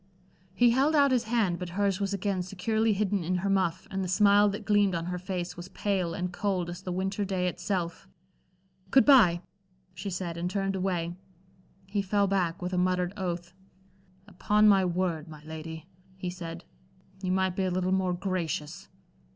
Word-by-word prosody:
He 240 Hz, +2 st, +5 dB
held 275 Hz, +6 st, +3 dB
out 280 Hz, -2 st, +5 dB
his 245 Hz, -3 st, +2 dB
hand, 215 Hz, -7 st, +1 dB
but 180 Hz, -1 st, -5 dB
hers 200 Hz, -2 st, +1 dB
was 200 Hz, -1 st, -1 dB
again 200 Hz, -1 st, -1 dB
securely 215 Hz, +4 st, 0 dB
hidden 200 Hz, -2 st, 0 dB
in 180 Hz, +3 st, -1 dB
her 200 Hz, -, +2 dB
muff, 185 Hz, -2 st, 0 dB
and 195 Hz, 0 st, -2 dB
the -, -, -2 dB
smile 205 Hz, +2 st, +5 dB
that 205 Hz, +1 st, -5 dB
gleamed 205 Hz, -3 st, +3 dB
on 165 Hz, 0 st, -2 dB
her 180 Hz, 0 st, -3 dB
face 180 Hz, -1 st, -4 dB
was 175 Hz, +1 st, -8 dB
pale 185 Hz, -5 st, -1 dB
and 180 Hz, 0 st, -3 dB
cold 185 Hz, -3 st, -1 dB
as 175 Hz, +1 st, -8 dB
the 185 Hz, -, -5 dB
winter 190 Hz, +3 st, -1 dB
day 185 Hz, -2 st, -1 dB
itself. 180 Hz, -1 st, -3 dB, 0.8 s
"Good 265 Hz, -, +5 dB
bye," 210 Hz, -12 st, +6 dB, 0.5 s
she 200 Hz, -, -5 dB
said, 175 Hz, -2 st, -4 dB
and 175 Hz, +1 st, -2 dB
turned 195 Hz, 0 st, -1 dB
away. 180 Hz, -3 st, -1 dB, 0.7 s
He 200 Hz, +1 st, -1 dB
fell 200 Hz, +1 st, +1 dB
back, 185 Hz, -3 st, 0 dB
with 180 Hz, +1 st, -3 dB
a 180 Hz, -, +1 dB
muttered 180 Hz, 0 st, +1 dB
oath. 175 Hz, -2 st, -4 dB, 0.7 s
"Upon 210 Hz, +2 st, +2 dB
my 195 Hz, -2 st, +6 dB
word, 175 Hz, -3 st, -1 dB
my 155 Hz, -2 st, -11 dB
lady," 160 Hz, 0 st, -7 dB, 0.3 s
he 180 Hz, -1 st, -4 dB
said, 170 Hz, -1 st, -7 dB, 0.6 s
"you 185 Hz, -2 st, -1 dB
might 190 Hz, -1 st, +1 dB
be 190 Hz, -, 0 dB
a -, -, +1 dB
little 185 Hz, +1 st, 0 dB
more 190 Hz, -1 st, +1 dB
gracious." 175 Hz, -1 st, -3 dB
185 Hz, 185 wpm, -28 LUFS, 175-200 Hz, 0.8 s, bye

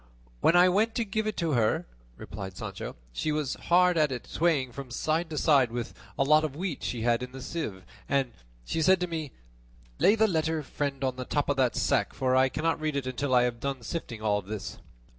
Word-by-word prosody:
"When 165 Hz, -, +4 dB
I 180 Hz, +1 st, +7 dB
went 215 Hz, +5 st, +2 dB
to 235 Hz, -, 0 dB
give 215 Hz, +1 st, -2 dB
it 215 Hz, -, -3 dB
to 165 Hz, -3 st, 0 dB
her," 115 Hz, -5 st, +2 dB, 0.3 s
replied 95 Hz, -2 st, -8 dB
Sancho, -, -, -6 dB, 0.2 s
"she 155 Hz, -, -1 dB
was 150 Hz, -3 st, -1 dB
hard 180 Hz, -1 st, +3 dB
at 150 Hz, -2 st, +3 dB
it 125 Hz, -2 st, -5 dB
swaying 150 Hz, -7 st, +1 dB
from 135 Hz, +1 st, -8 dB
side 155 Hz, +6 st, -1 dB
to 155 Hz, -, -5 dB
side 140 Hz, -7 st, +4 dB
with 120 Hz, 0 st, -4 dB, 0.2 s
a -, -, +3 dB
lot 155 Hz, +3 st, +5 dB
of 150 Hz, -3 st, -3 dB
wheat 175 Hz, -2 st, -3 dB
she 115 Hz, -2 st, -3 dB
had 120 Hz, 0 st, +2 dB
in 125 Hz, 0 st, -6 dB
the 135 Hz, -, -7 dB
sieve, 125 Hz, -, -5 dB, 0.3 s
and 135 Hz, -3 st, +1 dB, 0.3 s
she 160 Hz, -, -1 dB
said 185 Hz, +3 st, +5 dB
to 180 Hz, -, 0 dB
me, 160 Hz, -5 st, -4 dB, 0.7 s
'Lay 205 Hz, -, +5 dB
the 220 Hz, 0 st, +4 dB
letter, 160 Hz, -3 st, 0 dB
friend, 140 Hz, 0 st, -3 dB
on 130 Hz, -1 st, -1 dB
the 130 Hz, -, -4 dB
top 145 Hz, +2 st, -1 dB
of 145 Hz, -, +1 dB
that 130 Hz, -2 st, +2 dB
sack, -, -, +1 dB
for 130 Hz, -1 st, +1 dB
I 130 Hz, 0 st, +4 dB
cannot 160 Hz, +2 st, -1 dB
read 155 Hz, -2 st, -1 dB
it 140 Hz, -2 st, -1 dB
until 130 Hz, +1 st, -1 dB
I 125 Hz, -, +6 dB
have 120 Hz, -1 st, -1 dB
done 135 Hz, -1 st, -3 dB
sifting 115 Hz, -6 st, -5 dB
all 105 Hz, -1 st, +2 dB
this." 100 Hz, 0 st, -6 dB
140 Hz, 225 wpm, -28 LUFS, 125-165 Hz, 0.7 s, I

